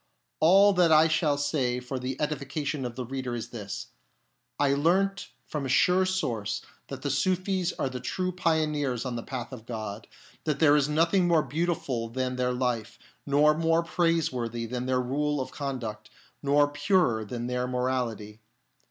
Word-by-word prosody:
All 195 +5 +6
that 180 -3 +4
I 155 +1 +7
shall 155 -3 +1
say 135 -4 0
for 125 +1 -5
the 130 +1 -4
edification 145 -1 -2
of 120 -1 -5
the 125 - -4
reader 130 -1 -4
is 115 - -5
this: 100 -4 -6 0.7
I 140 -1 +3
learnt 180 +6 +1 0.2
from 150 -2 -4
a 135 - -3
sure 180 +8 +4
source 115 - -2 0.2
that 135 -1 -7
the 140 - 0
Sufis 185 +4 0
are - - -2
the 130 -1 -5
true 185 +9 -2
pioneers 150 -7 0
on 125 -2 -3
the 115 - -3
path 120 -1 -6
of 115 -2 -10
God; 110 -2 -5 0.4
that 150 -3 0
there 145 -1 +5
is 150 -1 +2
nothing 165 +4 +3
more 165 -3 +4
beautiful 145 -8 -2
than 130 +1 -2
their 125 0 0
life, 125 -3 -2 0.3
nor 145 +2 +5
more 165 +1 +2
praiseworthy 140 -10 0
than 125 +2 -4
their 130 -1 +2
rule 145 +4 -1
of 130 - -4
conduct, 115 -7 -5 0.3
nor 145 +1 +4
purer 145 - +1
than 120 +3 -5
their 125 0 -1
morality. 125 -4 -2
135 Hz, 170 wpm, -27 LUFS, 125-160 Hz, 0.7 s, I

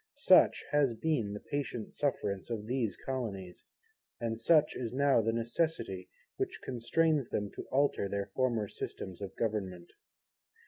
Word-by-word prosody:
Such - - +5
has 140 -5 +3
been 120 -6 0
the 105 - -5
patient 135 -5 -4
sufferance 105 -9 -1
of 110 -3 -3
these 115 -6 -1
Colonies; 100 -9 -5 0.5
and 115 -1 -2
such 150 +4 +4
is 120 -3 -3
now 140 -1 +4
the 115 +1 +1
necessity 115 - -1 0.3
which - - -2
constrains 140 +3 +1
them 105 -1 -2
to - - -8
alter 135 -7 +2
their 100 0 -3
former 120 -5 +1
Systems 95 -1 -6
of 100 - -6
Government. 95 -6 -2
115 Hz, 140 wpm, -32 LUFS, 100-135 Hz, 0.5 s, Such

